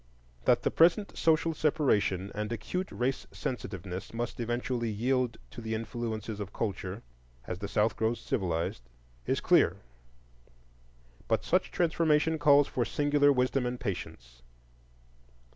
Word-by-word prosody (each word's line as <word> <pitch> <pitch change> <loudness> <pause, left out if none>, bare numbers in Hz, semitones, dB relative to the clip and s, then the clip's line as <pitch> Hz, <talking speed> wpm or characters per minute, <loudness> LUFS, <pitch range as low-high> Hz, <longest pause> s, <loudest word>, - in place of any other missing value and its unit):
That - - +4
the - - +1
present 175 +5 +3
social 165 0 +2
separation 125 - +1
and 105 +1 -3
acute 120 - -3
race 130 +2 -2
sensitiveness 95 -5 -5
must 120 +1 -3
eventually 120 0 -1
yield 125 +3 0
to - - -8
the 110 0 -2
influences 110 -1 -4
of 100 -1 -5
culture, 105 -4 -4 0.4
as 90 - -5
the 100 - -4
South 105 +2 +1
grows 115 +1 0
civilized, 85 - -2 0.5
is - - +1
clear. - - +4 1.5
But - - +1
such - - +1
transformation 160 -2 +2
calls 145 -1 +6
for 125 - -1
singular 145 +2 +3
wisdom 125 -1 +1
and 125 0 -4
patience. - - -6
120 Hz, 125 wpm, -30 LUFS, 105-145 Hz, 1.5 s, calls